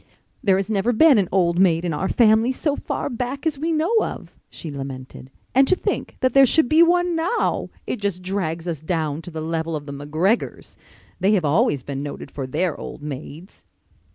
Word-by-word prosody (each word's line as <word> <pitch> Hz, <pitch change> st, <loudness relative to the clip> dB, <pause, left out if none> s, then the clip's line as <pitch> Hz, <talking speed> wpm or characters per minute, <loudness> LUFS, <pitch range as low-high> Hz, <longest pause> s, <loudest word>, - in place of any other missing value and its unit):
"There 195 Hz, -3 st, +4 dB
has 195 Hz, -, -1 dB
never 220 Hz, +3 st, +1 dB
been 275 Hz, 0 st, +6 dB
an 190 Hz, -, 0 dB
old 175 Hz, -2 st, +2 dB
maid 175 Hz, -2 st, +3 dB
in 170 Hz, -, -1 dB
our 190 Hz, +5 st, -2 dB
family 225 Hz, +1 st, +4 dB
so 285 Hz, +2 st, -1 dB
far -, -, -3 dB
back 255 Hz, +2 st, -4 dB
as 300 Hz, -4 st, -1 dB
we 325 Hz, +3 st, -1 dB
know 325 Hz, +8 st, +1 dB
of," -, -, -6 dB
she 160 Hz, -, -8 dB
lamented. 135 Hz, -2 st, -8 dB, 0.2 s
"And 270 Hz, +1 st, +5 dB
to 370 Hz, -, +4 dB
think -, -, -3 dB
that 255 Hz, -, +2 dB
there 275 Hz, -1 st, +7 dB
should 315 Hz, +2 st, +3 dB
be 310 Hz, +6 st, +5 dB
one 350 Hz, 0 st, +3 dB
now! 340 Hz, +8 st, 0 dB, 0.2 s
It 225 Hz, -, -4 dB
just 190 Hz, -3 st, -2 dB
drags 180 Hz, -3 st, -3 dB
us 160 Hz, -4 st, -3 dB
down 155 Hz, -2 st, -2 dB
to 165 Hz, -, -9 dB
the 160 Hz, -2 st, -6 dB
level 160 Hz, 0 st, -2 dB
of 145 Hz, -1 st, -5 dB
the 140 Hz, -, -7 dB
McGregors. 155 Hz, +10 st, -1 dB, 0.4 s
They 200 Hz, +3 st, +3 dB
have 185 Hz, -6 st, +2 dB
always 150 Hz, -, +2 dB
been 140 Hz, -1 st, -5 dB
noted 145 Hz, 0 st, -7 dB
for 135 Hz, -2 st, -5 dB
their 170 Hz, +5 st, -1 dB
old 145 Hz, -, -8 dB
maids." 150 Hz, -, -8 dB
185 Hz, 205 wpm, -22 LUFS, 155-255 Hz, 0.4 s, there